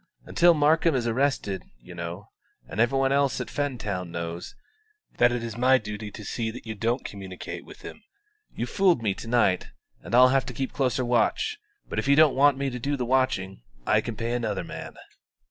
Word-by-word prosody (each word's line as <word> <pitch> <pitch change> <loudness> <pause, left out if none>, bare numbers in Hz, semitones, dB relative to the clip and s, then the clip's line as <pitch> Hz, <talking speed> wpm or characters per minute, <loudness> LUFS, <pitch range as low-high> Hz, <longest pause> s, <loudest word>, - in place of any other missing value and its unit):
"Until 175 -1 +4
Markham 155 +1 +3
is 125 -2 0
arrested, 115 -6 0 0.2
you 90 +9 -12
know, 85 +3 -7 0.4
and - - -7
every 120 +4 +3
one 135 0 +2
else 140 -1 +2
at - - -5
Fentown 105 -11 -3
knows, 85 +1 -6 0.6
that 120 0 +5
it 120 -1 -2
is 115 -2 -5
my 130 +1 +5
duty 105 -1 -6
to 105 0 -10
see 115 +1 -2
that 120 +2 -9
you 110 - -4
don't 115 +4 -1
communicate 95 -3 -7
with - - -14
him. - - -9 0.5
You've - - -5
fooled 180 - +3
me 100 -3 +1
to 115 - -9
night, 110 -6 +2 0.3
and - - -3
I'll 125 +1 +8
have 135 0 +1
to 125 - -6
keep 135 +1 -3
closer 130 -2 0
watch; 120 - +1 0.3
but - - -3
if - - -3
you 140 - +5
don't 155 -2 +6
want 140 0 +4
me 135 -1 -2
to 125 - -5
do 140 +4 -1
the 125 - -2
watching, 120 - 0 0.2
I - - +3
can 115 - -5
pay 115 +2 -3
another 115 -4 -2
man." - - -8
120 Hz, 205 wpm, -26 LUFS, 105-135 Hz, 0.6 s, I'll